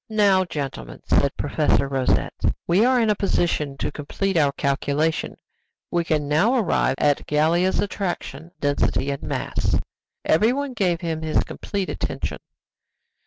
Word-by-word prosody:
"Now, 200 -3 +3
gentlemen," 135 - -6
said - - +2
Professor 140 - +1
Rosette, 135 -2 0 0.3
"we 180 +5 +3
are 255 +1 +4
in 225 -2 +3
a - - +2
position 165 -8 0
to - - -2
complete 195 +6 -3
our 145 -4 +4
calculation; 145 +3 -1 0.5
we 175 -1 +1
can 155 -3 0
now 160 - +3
arrive 185 - +1
at 145 -1 +1
Gallia's 165 +5 +2
attraction, 185 -4 -3
density, 140 -1 0
and 140 - -4
mass." - - -1 0.5
Everyone 255 - +2
gave 180 -6 0
him 165 -2 -3
his 155 -1 +1
complete 200 -2 -4
attention. - - -4
165 Hz, 135 wpm, -23 LUFS, 145-195 Hz, 0.5 s, are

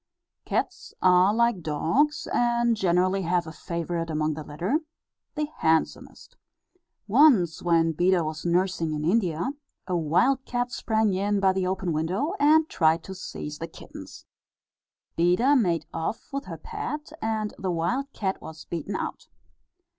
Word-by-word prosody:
Cats - - -3
are 185 +1 +5
like 235 -3 +2
dogs, 170 - 0
and 235 -1 +2
generally 185 0 +2
have 175 -1 0
a 160 - -7
favourite 170 0 -4
among 155 0 0
the 155 +1 -6
litter, 175 - -1 0.6
the 300 0 0
handsomest. 160 0 -1 0.7
Once 210 - +4
when 165 -1 +3
Beda 175 +2 +2
was 155 0 -5
nursing 175 -2 0
in 150 0 -3
India, 180 - +1 0.3
a 180 - -2
wild 180 - +2
cat 245 -1 -2
sprang 220 -4 0
in 200 +2 0
by 190 -1 +3
the 190 -1 -1
open 185 -2 -1
window, 180 - -1
and 310 +2 +5
tried 160 - +2
to 190 - -7
seize 150 -5 -7
the 165 - -4
kittens. - - -12 0.9
Beda 180 +12 +4
made 175 - +1
off 165 +11 -4
with 275 +1 -3
her - - -7
pet, 415 -10 -6
and 220 -1 -2
the 190 - -2
wild 235 +12 -1
cat 190 -6 -3
was 160 0 -10
beaten 170 +4 -4
out. - - -5
185 Hz, 145 wpm, -26 LUFS, 165-235 Hz, 0.9 s, are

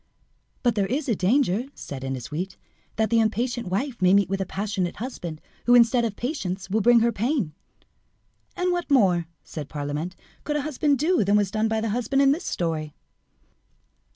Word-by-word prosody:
"But 240 -2 +3
there 200 -2 0
is 280 +6 -2
a 230 - +2
danger," 225 +3 +2
said 135 -2 -7
Ennasuite, 150 +8 -4 0.4
"that 220 +1 0
the 230 - +4
impatient 235 +1 0
wife 235 +7 -2
may 185 +1 +5
meet 200 -2 +3
with 195 0 -1
a 190 - -2
passionate 195 -3 -2
husband 175 -10 -6 0.3
who, 245 - +7
instead 240 0 +5
of 215 -3 -3
patience, 195 - -4
will 220 +2 +2
bring 235 +2 +6
her 235 +1 +3
pain." 230 - -1 1.0
"And 360 0 0
what 350 -2 -2
more," 185 - +3 0.2
said 150 -3 -7
Parlamente, 150 +4 -4 0.3
"could 295 - -2
a 295 - 0
husband 295 -1 +1
do 330 - +2
than 200 +2 +2
was 205 -2 +1
done 215 +1 +1
by 220 0 0
the 225 - -1
husband 245 +5 +1
in 275 - +5
the 295 - +1
story?" 160 - -3
220 Hz, 180 wpm, -25 LUFS, 180-255 Hz, 1.0 s, who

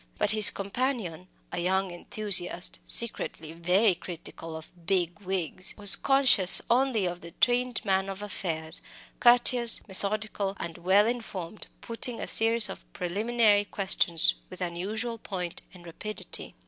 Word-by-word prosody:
But - - -1
his 215 0 +8
companion 200 - -5 0.2
a - - -5
young 190 +1 -1
enthusiast, 180 0 0
secretly 165 -8 +2
very 180 +5 +1
critical 165 -2 -10
of 160 - -13 0.2
"big 180 -2 -1
wigs" 185 -2 -4
was 205 -2 +7
conscious 265 -9 +6
only 245 -4 +1
of 175 0 -5
the 170 0 -13
trained 245 -1 0
man 190 -1 -1
of 195 +1 -8
affairs, 160 -6 -3 0.4
courteous, 240 -1 +3
methodical, 200 0 -5
and 170 0 -8
well 190 +4 +2
informed, 215 -5 -6
putting 230 +1 -3
a - - -4
series 225 0 +4
of - - -9
preliminary 205 +3 0
questions 190 -5 0 0.2
with 185 - -12
unusual 205 +7 -3
point 180 -5 -6
and 180 -2 -17
rapidity. 210 +6 -7
195 Hz, 135 wpm, -26 LUFS, 175-225 Hz, 0.4 s, his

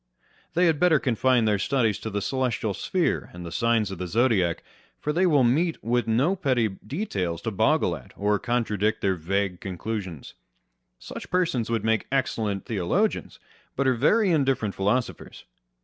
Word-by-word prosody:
They 180 +2 +4
had 160 -4 +2
better 175 -3 +5
confine 125 -2 +2
their 105 -2 +2
studies 115 -2 +1
to 110 - -5
the 100 -1 -3
celestial 125 -3 -1
sphere 180 - -1
and 90 0 -8
the 85 - -7
signs 115 -2 +1
of 95 - -7
the 90 - -3
zodiac; 100 -4 +1 0.4
for 150 - -2
there 175 - +1
they - - +5
will 145 -6 +4
meet 160 +8 +1
with 120 0 0
no 130 +12 +2
petty 130 - +1
details 100 - -4
to 115 - -2
boggle 110 - +2
at, 65 -5 -12
or 105 0 +1
contradict 110 -3 0
their 95 -1 +2
vague 95 +2 -2
conclusions. 95 -4 -5 0.6
Such - - -9
persons 165 -11 0
would 115 -2 -1
make 110 0 +1
excellent 110 -7 -1
theologians, 95 -6 -1 0.4
but 140 - 0
are 130 - +4
very 190 - +3
indifferent 135 - +1
philosophers. 110 +6 -2
115 Hz, 165 wpm, -25 LUFS, 100-135 Hz, 0.6 s, better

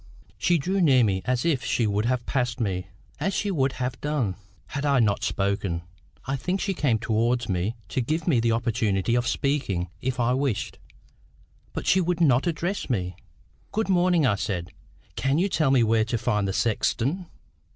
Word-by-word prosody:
She 175 -1 +3
drew 185 +6 0
near 135 -7 +5
me, 95 -3 +1
as 125 +1 0
if 150 -6 +1
she 115 - +1
would 105 +1 0
have 120 -1 0
passed 125 -2 -1
me, 95 -5 -2 0.3
as 195 - -1
she 205 - 0
would 135 -6 +1
have 125 -1 -4
done, 140 -10 -1 0.3
had 140 +1 -3
I 140 -2 +3
not 105 -4 +2
spoken. 100 -4 -1 0.4
I 135 - -1
think 180 +8 -2
she 195 0 -1
came 140 -10 +1
towards 115 +2 0
me 95 +4 -1
to 130 - 0
give 155 +7 -2
me 140 -9 +4
the 115 0 +2
opportunity 115 -3 0
of 120 0 +1
speaking 125 - -1
if 130 0 -2
I 120 +1 +2
wished, 130 -5 -1 0.9
but - - -5
she 190 - +4
would 175 -1 0
not 140 -2 +4
address 170 +2 -2
me. 90 -7 -1 0.6
"Good 220 -1 -1
morning," 175 -4 +3
I 110 -6 +2
said. 90 -4 -3 0.4
"Can 135 +2 +1
you 185 +4 +2
tell 155 -7 +1
me 130 -3 +4
where 110 0 +3
to 115 +1 -1
find 105 -3 0
the 95 - -1
sexton?" 130 - 0
125 Hz, 185 wpm, -25 LUFS, 110-150 Hz, 0.9 s, near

